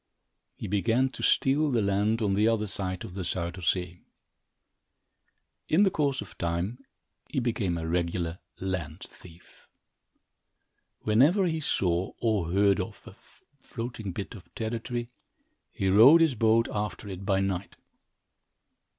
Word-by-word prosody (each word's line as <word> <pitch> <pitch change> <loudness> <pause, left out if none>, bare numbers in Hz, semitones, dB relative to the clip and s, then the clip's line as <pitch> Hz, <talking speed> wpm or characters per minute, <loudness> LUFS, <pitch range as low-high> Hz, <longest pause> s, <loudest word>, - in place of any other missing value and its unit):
He - - -7
began 115 +6 +1
to - - -9
steal 145 +3 +3
the 120 -5 +1
land 105 +3 +1
on 100 -2 +1
the 105 +3 +3
other 110 -2 +1
side 95 -2 -4
of 90 - -8
the 95 - -5
Zuyder 85 +1 -3
Zee. 90 0 -1 1.7
In 175 +6 +4
the 195 - +3
course 140 -7 0
of 105 - -11
time, 85 +8 -2 0.5
he 140 - -1
became 110 -8 -1
a 80 -1 -4
regular 85 0 -1 0.2
land 90 -3 -4
thief. 85 -1 -15 1.3
Whenever 145 - +4
he 160 -2 -1
saw, 90 - 0
or 105 -8 0
heard 100 0 +3
of, - - -5
a - - -11 0.5
floating 115 -4 -5
bit 100 +6 -6
of 100 -6 -13
territory, 120 +1 -3 0.6
he 95 - -2
rowed 120 - +8
his 160 -4 +4
boat 115 0 +3
after 105 0 -4
it 95 -1 -7
by 95 -1 +1
night. 95 -2 -2
100 Hz, 140 wpm, -28 LUFS, 90-120 Hz, 1.7 s, rowed